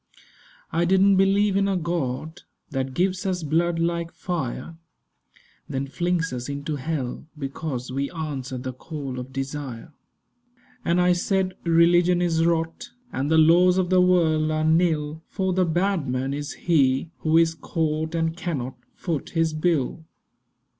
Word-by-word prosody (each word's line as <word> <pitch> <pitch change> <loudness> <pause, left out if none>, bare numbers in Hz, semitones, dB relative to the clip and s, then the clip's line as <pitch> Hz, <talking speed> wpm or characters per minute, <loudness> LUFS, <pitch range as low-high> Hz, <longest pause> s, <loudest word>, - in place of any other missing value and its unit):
I 170 - +1
didn't 190 +2 +4
believe 195 +1 +3
in 195 0 +2
a 195 -1 +1
God 160 -2 -3 0.3
That 135 -1 -3
gives 185 +1 +1
us 185 -3 -1
blood 165 +3 +1
like 170 0 -1
fire, 165 -2 -4 0.9
Then 135 +1 -2
flings 175 +3 -1
us 125 +2 -5
into 140 +1 -3
hell 140 -1 -4
because 135 -3 -4
We 140 +2 -2
answer 145 -5 -5
the 130 +1 -5
call 135 -1 -6
of 125 +1 -7
desire. 135 0 -5 0.9
And 170 +1 +2
I 180 0 +4
said: 185 +1 0
'Religion 175 +1 +4
is 165 -2 +1
rot, 165 -1 -1 0.2
And 135 +2 -1
the 160 - +4
laws 175 +3 +6
of 185 -1 0
the 185 -1 +5
world 160 -4 +3
are 155 0 0
nil; 160 -2 +1
For 190 -2 -1
the 185 0 +2
bad 175 -1 0
man 130 +2 -1
is 145 0 -4
he 140 -2 +1
who 160 0 +2
is 165 -1 +4
caught 160 0 -2
And 165 0 0
cannot 140 -8 -4 0.2
foot 165 -6 -3
his 165 -1 +2
bill. 155 -2 0
160 Hz, 150 wpm, -24 LUFS, 140-175 Hz, 0.9 s, laws